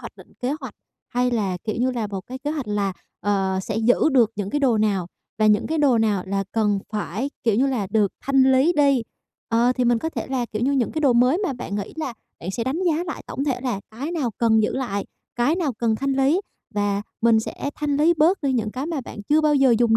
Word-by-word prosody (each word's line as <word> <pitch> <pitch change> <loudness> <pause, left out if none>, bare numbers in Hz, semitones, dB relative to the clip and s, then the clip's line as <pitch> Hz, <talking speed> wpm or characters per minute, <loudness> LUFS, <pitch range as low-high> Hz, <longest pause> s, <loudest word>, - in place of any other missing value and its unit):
hoạch - - -10
định - - -16
kế 255 - 0
hoạch - - -8 0.3
hay 250 0 +1
là, 200 -6 0
kiểu 215 - -2
như 255 +1 +2
là, 235 -4 -2
một 195 -2 -5
cái 260 +1 -7
kế 290 +3 -3
hoạch 290 -8 -4
là, 200 -2 0 0.3
ờ, 195 -2 0
sẽ - - -3
giữ 225 +6 +3
được 235 -4 +4
những 200 -1 -3
cái 290 - 0
đồ 245 -6 +3
nào 200 -5 +1 0.3
và 215 - +4
những 210 0 +3
cái 320 +1 -1
đồ 265 -6 +4
nào 210 -4 +1
là 195 +1 -1
cần 210 -3 +2
phải, 215 +6 -2
kiểu 225 -3 +2
như 260 +5 +3
là, 240 -8 -1
được 210 -3 +2
thanh 265 -1 +4
lý 270 +7 +4
đi. 280 -4 +4 0.5
Ờ, 235 +2 +3
thì 250 -1 0
mình 240 -1 +3
có 320 - -2
thể - - -4
là, 260 -3 -1
kiểu 215 +2 -2
như, 275 +3 +2
những 255 -4 +1
cái 315 - -2
đồ 275 -5 +4
mới 250 +7 +4
mà 355 - 0
bạn 240 -5 -6
nghĩ 200 - -4
là 310 -6 -3 0.3
bạn 175 - -4
sẽ 230 +4 -3
đánh 280 +8 -1
giá 335 +1 +1
lại 320 - -6
tổng 275 - -3
thể 265 -4 -1
là 245 -6 -2
cái 270 +9 -5
nào 275 -9 -1
cần 220 -2 +4
giữ - - 0
lại, 240 -7 -2 0.3
cái 245 +7 +2
nào 310 -8 0
cần 225 -2 +1
thanh 275 +3 -1
lý 275 +7 +3 0.3
và 205 -1 0 0.2
mình 225 -1 +4
sẽ 280 - -5
thanh 295 -2 -1
lý 320 +4 +4
bớt 330 +5 +3
đi 275 - +1
những 225 -4 0
cái 260 +6 -4
mà 325 -4 -2
bạn 215 -4 -9
chưa 305 +1 +4
bao 300 -1 +3
giờ 270 -4 +5
dùng 230 -2 +4
245 Hz, 260 wpm, -23 LUFS, 215-275 Hz, 0.5 s, giờ